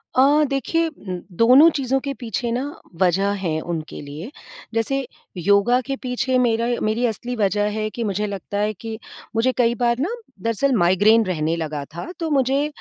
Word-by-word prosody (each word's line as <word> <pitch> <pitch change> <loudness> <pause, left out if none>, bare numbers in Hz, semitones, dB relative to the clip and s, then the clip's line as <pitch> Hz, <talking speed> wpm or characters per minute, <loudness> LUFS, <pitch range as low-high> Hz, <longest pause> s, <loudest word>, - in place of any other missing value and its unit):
अ, 285 +4 +5
देखिए, 325 +5 0
उम, 185 - -7 0.2
दोनों 255 +8 +7
चीज़ों 270 0 0
के 280 -1 -3
पीछे 235 0 -3
ना 250 +3 -1 0.4
वजह 190 +2 +3
है 160 -2 0
उनके 165 -2 -5
लिए। 150 - -8 0.4
जैसे 265 +4 0 0.3
योगा 200 +7 +3
के 275 - -1
पीछे 255 0 0
मेरा 235 -1 +2
मेरी 220 +3 +1
असली 240 +2 -3
वजह 205 -1 +1
है 215 0 -1
कि 235 - -2
मुझे 210 0 -1
लगता 200 0 -5
है 210 +1 0
कि 220 +2 -7 0.4
मुझे 245 +3 +3
कई 235 -1 +3
बार 240 -1 +1
ना 325 +9 0 0.3
दरअसल 230 +4 +1
माइग्रेन 205 +4 +4
रहने 165 -3 -1
लगा 155 -3 -4
था 255 - -6
तो 325 -1 -2
मुझे 275 +1 +2
230 Hz, 175 wpm, -22 LUFS, 200-260 Hz, 0.4 s, दोनों